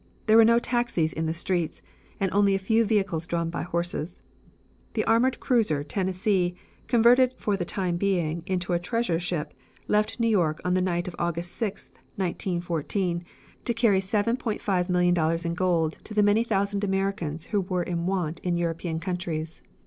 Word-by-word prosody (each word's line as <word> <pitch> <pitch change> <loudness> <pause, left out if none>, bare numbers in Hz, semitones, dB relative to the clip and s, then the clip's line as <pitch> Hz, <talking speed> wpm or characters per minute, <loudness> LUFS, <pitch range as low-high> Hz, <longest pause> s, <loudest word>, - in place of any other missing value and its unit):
There 220 - +4
were 225 - +9
no 230 +1 +5
taxis 240 -10 0
in 160 - -2
the 160 - 0
streets, 170 -1 -1 0.4
and 195 -1 0
only 200 -1 +4
a - - +2
few 220 +4 +2
vehicles 195 -6 0
drawn 170 -1 -1
by - - -3
horses. 170 -1 -3 0.8
The - - +1
armored 240 +3 +3
cruiser 210 - +1
Tennessee, 185 +2 0 0.3
converted 245 +2 +5
for 210 -5 -1
the 185 -3 -3
time 180 -1 -1
being 170 -4 0
into 180 -2 -1
a 170 - +2
treasure 180 -2 -1
ship, 175 -3 -3 0.3
left 210 +3 +1
New 230 - +2
York 170 -8 +2
on 180 - +1
the 185 - +2
night 175 -1 -1
of 175 - -6
August 170 0 -2
6th, 210 -2 -3 0.2
1914, 175 -1 -2 0.4
to 235 - +1
carry 225 -4 +3
$7,500,000 180 -6 +1
in 170 - -1
gold 170 -3 0
to 215 - -7
the 210 - +4
many 205 +3 +4
thousand 200 -2 0
Americans 195 -5 -1
who 205 - +3
were 180 -1 -1
in 170 0 -2
want 175 -4 -1
in 175 -1 -1
European 165 -1 -2
countries. 165 -3 -4
180 Hz, 165 wpm, -26 LUFS, 170-205 Hz, 0.8 s, were